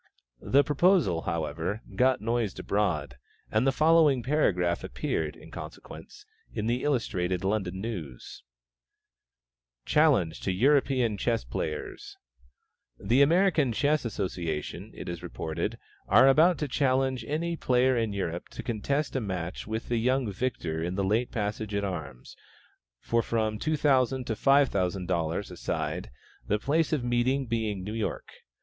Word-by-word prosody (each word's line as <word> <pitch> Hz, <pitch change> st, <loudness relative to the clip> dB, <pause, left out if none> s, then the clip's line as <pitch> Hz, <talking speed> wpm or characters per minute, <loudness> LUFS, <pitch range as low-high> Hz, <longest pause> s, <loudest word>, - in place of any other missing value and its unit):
The 140 Hz, +2 st, +4 dB
proposal, 145 Hz, -, +3 dB
however, 80 Hz, +6 st, -3 dB
got 130 Hz, +1 st, +3 dB
noised 115 Hz, -2 st, -1 dB
abroad, 95 Hz, -11 st, -1 dB, 0.3 s
and 110 Hz, +5 st, +2 dB
the -, -, +5 dB
following 155 Hz, -3 st, +4 dB
paragraph 90 Hz, -, +1 dB
appeared, -, -, -2 dB
in -, -, -14 dB
consequence, 420 Hz, 0 st, -10 dB, 0.3 s
in 105 Hz, -, -3 dB
the 120 Hz, +2 st, 0 dB
Illustrated 95 Hz, -10 st, 0 dB
London 95 Hz, -2 st, -1 dB
News: 85 Hz, -, -7 dB, 1.4 s
"CHALLENGE 130 Hz, -, +3 dB
TO 95 Hz, -, -1 dB
EUROPEAN 130 Hz, 0 st, +2 dB
CHESS 95 Hz, -, 0 dB
PLAYERS."[B] 75 Hz, +5 st, -5 dB, 0.9 s
"The 125 Hz, +4 st, +5 dB
American 160 Hz, -3 st, +4 dB
Chess 145 Hz, +5 st, +1 dB
Association, 90 Hz, -9 st, -4 dB
it -, -, -8 dB
is 85 Hz, -1 st, -5 dB
reported, 80 Hz, -1 st, -4 dB, 0.3 s
are 130 Hz, -, +6 dB
about 160 Hz, +6 st, +5 dB
to 150 Hz, -, -2 dB
challenge 130 Hz, -2 st, +1 dB
any 170 Hz, +3 st, -1 dB
player 130 Hz, -3 st, +2 dB
in 115 Hz, -3 st, 0 dB
Europe 90 Hz, -4 st, -4 dB
to -, -, -8 dB
contest 140 Hz, +7 st, -2 dB
a 130 Hz, -, 0 dB
match 90 Hz, -4 st, -4 dB
with 110 Hz, +1 st, -4 dB
the 120 Hz, -, 0 dB
young 125 Hz, -1 st, +1 dB
victor 95 Hz, -8 st, -3 dB
in 90 Hz, +2 st, -2 dB
the 100 Hz, -, 0 dB
late 110 Hz, +5 st, +1 dB
passage 105 Hz, -1 st, -3 dB
at 100 Hz, -, 0 dB
arms, 75 Hz, -10 st, -6 dB, 0.6 s
for 115 Hz, -, +1 dB
from 110 Hz, -2 st, -1 dB
$2,000 135 Hz, -4 st, +2 dB
to 115 Hz, -, -1 dB
$5,000 95 Hz, -, +1 dB
a -, -, -8 dB
side, -, -, -3 dB, 0.4 s
the 105 Hz, -, +2 dB
place 150 Hz, +8 st, +1 dB
of 150 Hz, -6 st, 0 dB
meeting 120 Hz, +3 st, +1 dB
being 110 Hz, -5 st, -2 dB
New 105 Hz, +3 st, -5 dB
York. 110 Hz, -1 st, -3 dB
115 Hz, 140 wpm, -28 LUFS, 95-135 Hz, 1.4 s, are